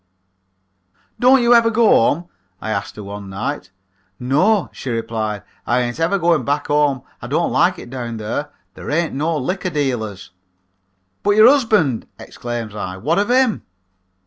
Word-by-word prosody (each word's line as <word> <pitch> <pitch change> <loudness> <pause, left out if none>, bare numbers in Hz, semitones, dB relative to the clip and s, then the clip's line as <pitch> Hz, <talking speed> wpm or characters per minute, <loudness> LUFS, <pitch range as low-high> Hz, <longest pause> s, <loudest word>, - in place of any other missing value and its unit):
"'Don't 255 0 +5
you 240 0 +5
ever 230 -1 +5
go 230 0 +3
home?' 165 - +3 0.3
I 110 - -4
asked 100 -2 -3
her 105 - -8
one 100 0 -8
night. 100 +2 -4 0.5
"'No,' 170 - +2
she 135 - -7
replied, 110 -3 -3 0.2
'I 120 +1 +2
ain't 120 +3 -3
ever 170 +5 +1
going 170 -3 +2
back 145 +1 -1
home. 145 -3 +2 0.2
I - - -6
don't - - 0
like - - +2
it 120 - -10
down 120 -3 -5
there. 110 +7 -4 0.2
There - - -9
ain't 165 +2 0
no 155 +4 -1
liquor 185 +7 -2
dealers.' 120 - -3 0.9
"'But 205 0 +2
your 215 +2 +8
husband,' 215 - +1
exclaims 120 -3 -6
I. 95 -3 -5
'What 155 - 0
of 205 - 0
him?' 255 -3 +3
145 Hz, 160 wpm, -19 LUFS, -, 0.9 s, your